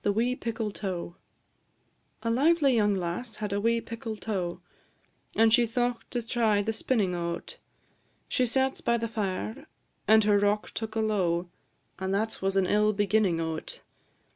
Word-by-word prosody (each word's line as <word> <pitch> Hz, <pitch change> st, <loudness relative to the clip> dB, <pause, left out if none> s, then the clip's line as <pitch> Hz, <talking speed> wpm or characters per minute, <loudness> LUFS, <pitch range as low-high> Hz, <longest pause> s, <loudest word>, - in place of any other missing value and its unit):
A 210 Hz, -5 st, -2 dB, 1.2 s
lively 280 Hz, +1 st, +4 dB
young 205 Hz, -2 st, +3 dB
lass 190 Hz, +6 st, -3 dB
had 210 Hz, -2 st, -3 dB
a 200 Hz, -, 0 dB
wee 230 Hz, +2 st, +2 dB
pickle 230 Hz, -1 st, -6 dB
tow, 185 Hz, -4 st, -3 dB, 0.8 s
And 225 Hz, 0 st, +5 dB
she 240 Hz, 0 st, +5 dB
thought 240 Hz, 0 st, -1 dB
to 240 Hz, -2 st, -3 dB
try 220 Hz, -4 st, +2 dB
the 220 Hz, +2 st, -1 dB
spinnin' 215 Hz, -4 st, 0 dB
o't; 170 Hz, 0 st, -4 dB, 0.7 s
She 250 Hz, -2 st, +1 dB
sat 265 Hz, +3 st, +1 dB
by 235 Hz, 0 st, +2 dB
the 230 Hz, 0 st, -2 dB
fire, 220 Hz, +6 st, -3 dB, 0.4 s
and 220 Hz, 0 st, +6 dB
her 205 Hz, -1 st, +4 dB
rock 205 Hz, +1 st, +1 dB
took 220 Hz, -1 st, -5 dB
alow, 180 Hz, -6 st, 0 dB, 0.5 s
And 190 Hz, 0 st, -2 dB
that 220 Hz, +2 st, -2 dB
was 195 Hz, 0 st, 0 dB
an 190 Hz, -, +3 dB
ill 210 Hz, +2 st, +3 dB
beginnin' 205 Hz, -4 st, +2 dB
o't. 160 Hz, -1 st, -4 dB
215 Hz, 140 wpm, -28 LUFS, 195-230 Hz, 1.2 s, and